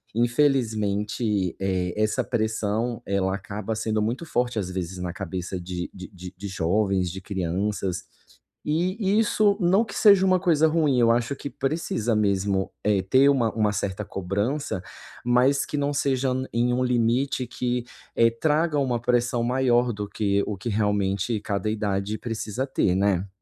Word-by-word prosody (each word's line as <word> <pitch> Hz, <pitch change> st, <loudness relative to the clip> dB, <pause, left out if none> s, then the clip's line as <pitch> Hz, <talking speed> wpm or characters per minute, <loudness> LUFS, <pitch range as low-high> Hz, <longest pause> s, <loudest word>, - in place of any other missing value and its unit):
Infelizmente, 110 Hz, -, +1 dB
eh, 95 Hz, -2 st, -1 dB
essa 110 Hz, 0 st, +1 dB
pressão 110 Hz, +1 st, -1 dB
ela 95 Hz, -1 st, 0 dB
acaba 105 Hz, +2 st, -5 dB
sendo 110 Hz, -1 st, -1 dB
muito 120 Hz, +9 st, -2 dB
forte, 125 Hz, -6 st, -1 dB
às 95 Hz, -3 st, -2 dB
vezes 90 Hz, 0 st, -4 dB
na 90 Hz, -1 st, -3 dB
cabeça 95 Hz, -1 st, -5 dB
de 90 Hz, 0 st, -5 dB
de 95 Hz, -1 st, -9 dB
de 90 Hz, -1 st, -10 dB
de 100 Hz, -, -6 dB
jovens, 95 Hz, 0 st, 0 dB
de 95 Hz, -, -6 dB
crianças, 95 Hz, 0 st, -2 dB, 0.6 s
e 185 Hz, +6 st, 0 dB
isso, 210 Hz, -2 st, +3 dB
não 190 Hz, +6 st, +4 dB
que 200 Hz, -, -9 dB
seja 200 Hz, -3 st, +6 dB
uma 185 Hz, -1 st, +4 dB
coisa 160 Hz, -4 st, +4 dB
ruim, 155 Hz, -5 st, +2 dB
eu 115 Hz, -1 st, +4 dB
acho 120 Hz, +3 st, +1 dB
que 140 Hz, -, -6 dB
precisa 135 Hz, -6 st, -1 dB
mesmo, 100 Hz, -2 st, +1 dB
eh, 105 Hz, -2 st, +2 dB
ter 130 Hz, +9 st, +5 dB
uma 120 Hz, -6 st, +2 dB
uma 105 Hz, -2 st, +1 dB
certa 100 Hz, +1 st, -2 dB
cobrança, 100 Hz, +5 st, -2 dB, 0.4 s
mas 125 Hz, +3 st, +3 dB
que 150 Hz, -, -3 dB
não 145 Hz, 0 st, 0 dB
seja 135 Hz, -2 st, +1 dB
n 130 Hz, +1 st, -3 dB
em 120 Hz, +1 st, +2 dB
um 125 Hz, -, +1 dB
limite 125 Hz, +2 st, +1 dB
que, 125 Hz, 0 st, -2 dB, 0.3 s
eh, 115 Hz, 0 st, +4 dB
traga 150 Hz, +4 st, +1 dB
uma 125 Hz, -3 st, 0 dB
pressão 120 Hz, 0 st, +1 dB
maior 125 Hz, -1 st, +2 dB
do 105 Hz, -1 st, -5 dB
que, 100 Hz, -1 st, 0 dB
o 105 Hz, -, -3 dB
que 95 Hz, -, -7 dB
realmente 105 Hz, +1 st, 0 dB
cada 100 Hz, -1 st, -2 dB
idade 105 Hz, -1 st, -2 dB
precisa 115 Hz, +2 st, -3 dB
ter, 95 Hz, -8 st, +1 dB
né. 95 Hz, -1 st, +1 dB
110 Hz, 160 wpm, -25 LUFS, 100-130 Hz, 0.6 s, seja